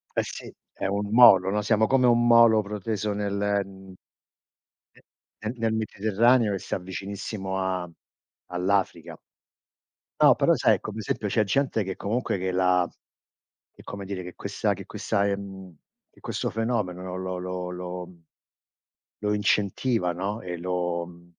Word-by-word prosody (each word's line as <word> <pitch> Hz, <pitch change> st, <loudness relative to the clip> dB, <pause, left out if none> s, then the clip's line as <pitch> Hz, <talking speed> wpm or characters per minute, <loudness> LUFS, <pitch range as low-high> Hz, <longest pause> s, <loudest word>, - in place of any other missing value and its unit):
Eh -, -, +2 dB
sì, -, -, -8 dB, 0.2 s
è 95 Hz, -, -3 dB
un 100 Hz, +1 st, -2 dB
molo 95 Hz, -6 st, +8 dB
no, 105 Hz, +1 st, 0 dB
siamo 110 Hz, +1 st, +2 dB
come 130 Hz, -1 st, +3 dB
un 120 Hz, 0 st, +4 dB
molo 115 Hz, -2 st, +6 dB
proteso 105 Hz, 0 st, -3 dB
nel 100 Hz, -1 st, -2 dB, 0.3 s
m 95 Hz, -1 st, -13 dB, 1.5 s
nel 110 Hz, +2 st, -2 dB
nel 115 Hz, -1 st, 0 dB
Mediterraneo 110 Hz, +2 st, +2 dB
che 95 Hz, -, -1 dB
sta 95 Hz, -, -3 dB
vicinissimo 95 Hz, +1 st, -5 dB
a 95 Hz, -2 st, -2 dB, 0.6 s
all'Africa. 90 Hz, -3 st, -1 dB, 1.0 s
No, -, -, +7 dB
però -, -, +3 dB
sai, -, -, +3 dB
come 110 Hz, +1 st, -7 dB
esempio, 105 Hz, 0 st, -2 dB
c'è 110 Hz, 0 st, +2 dB
gente 115 Hz, +1 st, 0 dB
che 95 Hz, 0 st, -4 dB
comunque 110 Hz, 0 st, -1 dB
che 95 Hz, 0 st, -2 dB
la 90 Hz, -1 st, +2 dB, 0.9 s
che -, -, -16 dB
come 100 Hz, -1 st, -7 dB
dire, 95 Hz, -2 st, -5 dB
che 90 Hz, -, -9 dB
questa -, -, -1 dB
che -, -, -9 dB
questa 100 Hz, 0 st, -1 dB
ehm, 95 Hz, -2 st, -5 dB, 0.4 s
che -, -, -23 dB
questo -, -, -3 dB
fenomeno 95 Hz, -6 st, -2 dB
lo 95 Hz, 0 st, -4 dB
lo 90 Hz, 0 st, -4 dB
lo 90 Hz, -1 st, -7 dB, 1.0 s
lo 105 Hz, 0 st, +1 dB
incentiva 100 Hz, -1 st, +1 dB
no 100 Hz, +5 st, -3 dB
e 90 Hz, -1 st, -5 dB
lo 90 Hz, -1 st, -2 dB
mhmm 85 Hz, 0 st, -15 dB
100 Hz, 145 wpm, -26 LUFS, 90-110 Hz, 1.5 s, molo